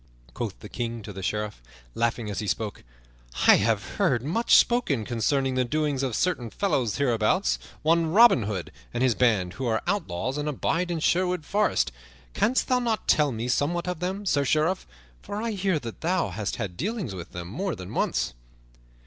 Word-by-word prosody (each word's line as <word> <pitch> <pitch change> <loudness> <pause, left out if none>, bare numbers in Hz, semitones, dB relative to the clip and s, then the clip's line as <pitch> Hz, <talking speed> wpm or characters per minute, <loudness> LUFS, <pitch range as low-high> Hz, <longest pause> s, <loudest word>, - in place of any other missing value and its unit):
Quoth - - -4
the - - -8
King 115 -2 -4
to 105 - -8
the 95 - -7
Sheriff, 105 - -3 0.3
laughing 115 -1 -1
as 105 - -3
he 105 - -3
spoke, 105 +2 -3 0.6
"I - - +9
have 105 0 +1
heard 140 - +2
much 185 - +3
spoken 155 - +3
concerning 130 +4 0
the 130 0 +2
doings 145 +1 0
of 130 -5 -1
certain 150 -10 0
fellows 135 - 0
hereabouts, 110 - +2 0.2
one 165 +1 +3
Robin 230 - +7
Hood 90 -7 -4 0.2
and 125 - +1
his 130 -2 +4
band, 105 -7 +2
who 130 - -3
are 110 -1 0
outlaws 135 - -2
and 145 +1 -1
abide 165 +5 -1
in 170 -2 -2
Sherwood 180 -1 +1
Forest. 200 - +1 0.4
Canst 250 - +1
thou 255 -1 +3
not 230 -3 -1
tell 150 -2 +4
me 115 +1 -3
somewhat 170 +8 0
of 180 -3 -2
them, 190 +3 -3
Sir 145 -6 +2
Sheriff? 155 +7 +1 0.3
For 205 - -5
I 230 +1 -2
hear 195 -4 0
that 120 -6 -7
thou 175 - +1
hast 100 +2 -3
had 100 -6 -5
dealings 205 - -3
with 90 -3 -8
them 85 -1 -6
more 180 - -3
than 90 0 -8
once." - - 0
135 Hz, 185 wpm, -26 LUFS, 110-180 Hz, 0.6 s, I